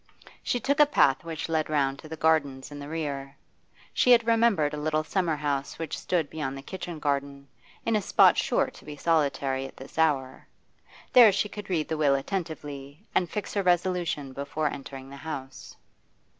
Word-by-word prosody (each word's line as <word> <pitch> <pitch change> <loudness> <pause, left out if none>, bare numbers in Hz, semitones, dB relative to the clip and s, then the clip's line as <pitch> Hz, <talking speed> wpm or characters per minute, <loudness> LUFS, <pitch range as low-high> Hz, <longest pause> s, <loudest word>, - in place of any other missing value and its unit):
She 245 - -1
took 280 +5 0
a 295 - +7
path 140 - +3
which 165 -2 -5
led 160 -2 0
round 140 -2 +1
to 155 - -11
the 160 - -6
gardens 145 -4 +1
in 145 - -8
the 145 0 -8
rear. 140 -4 -4 0.6
She - - +2
had 235 -1 +4
remembered 225 -10 +3
a - - -3
little 155 0 0
summer 170 -1 0
house 145 -2 -2
which 165 - -4
stood 170 -5 -1
beyond 140 -3 -4
the 135 - -9
kitchen 175 0 -6
garden, 140 -1 -2 0.4
in 225 - +2
a 210 - +2
spot - - +5
sure - - +1
to - - -16
be 150 0 -8
solitary 140 -4 0
at - - -16
this 135 +4 -9
hour. 135 -5 0 0.7
There 240 -4 +9
she 200 +2 0
could 205 -1 -8
read 165 -5 0
the 160 - -2
will 145 -3 +3
attentively, 145 -1 -5
and 175 - +1
fix 210 -2 -4
her 200 - +1
resolution 175 -6 0
before 140 +2 -2
entering 135 -1 -8
the 140 - -9
house. 140 -3 -7
155 Hz, 185 wpm, -27 LUFS, 140-175 Hz, 0.7 s, There